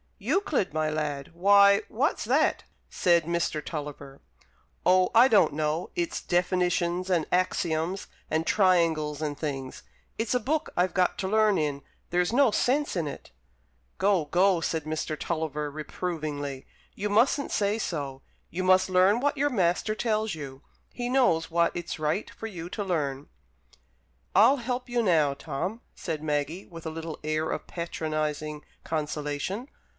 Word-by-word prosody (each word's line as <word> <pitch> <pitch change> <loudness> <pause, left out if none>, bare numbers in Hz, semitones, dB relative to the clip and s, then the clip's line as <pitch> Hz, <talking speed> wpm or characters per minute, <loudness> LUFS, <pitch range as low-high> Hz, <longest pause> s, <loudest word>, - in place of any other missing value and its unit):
"Euclid, 315 - 0
my 155 0 0
lad; 150 -2 -3
why, 200 +3 +6
what's 285 - -1
that?" - - +2 0.3
said 170 -2 +3
Mr. 165 -3 -1
Tulliver. 145 -3 -7 0.7
"Oh, 185 0 +5
I 240 +3 +8
don't 210 - +4
know. 155 +2 -1
It's 170 -1 -2
definitions, 180 0 0
and 170 -4 +2
axioms, 180 0 0 0.2
and 160 +1 0
triangles, 165 -7 +2
and 150 -2 -2
things. 135 -4 -5 0.4
It's 225 +2 0
a - - +3
book 300 +6 -1
I've 180 +1 +2
got 185 +1 +2
to 190 - -1
learn 215 -1 +3
in; 145 -2 -1 0.3
there's 180 +4 +1
no 270 0 +5
sense 280 +5 +1
in 165 -4 -1
it." 140 - -8 0.7
"Go, 195 -5 +3
go!" 180 +4 +3
said 160 -1 -1
Mr. 155 0 -3
Tulliver, 150 -3 -2
reprovingly, 150 -3 -4 0.3
"you 205 +1 -2
mustn't 245 +7 +2
say 205 +1 +1
so. 140 -9 -4 0.3
You 185 +2 -2
must 185 0 +4
learn 185 +4 +4
what 290 +1 +1
your 290 +1 +1
master 185 0 +1
tells 220 -2 0
you. 140 -3 -8 0.3
He 245 0 -3
knows 245 -12 +2
what 170 0 +2
it's 175 -1 -5
right 155 +7 -1
for - - -9
you 175 -5 -7
to 205 - -3
learn." 145 -7 -2 1.1
"I'll 230 +9 +6
help 250 0 -3
you 240 0 +1
now, 155 -8 +3
Tom," 180 +12 -4
said 155 -3 -4
Maggie, 150 +4 -2
with 165 -2 -11
a - - -3
little 160 0 -6
air 155 +1 -1
of - - -4
patronizing 155 -3 -3 0.2
consolation. 150 - -3
170 Hz, 150 wpm, -27 LUFS, 155-200 Hz, 1.1 s, I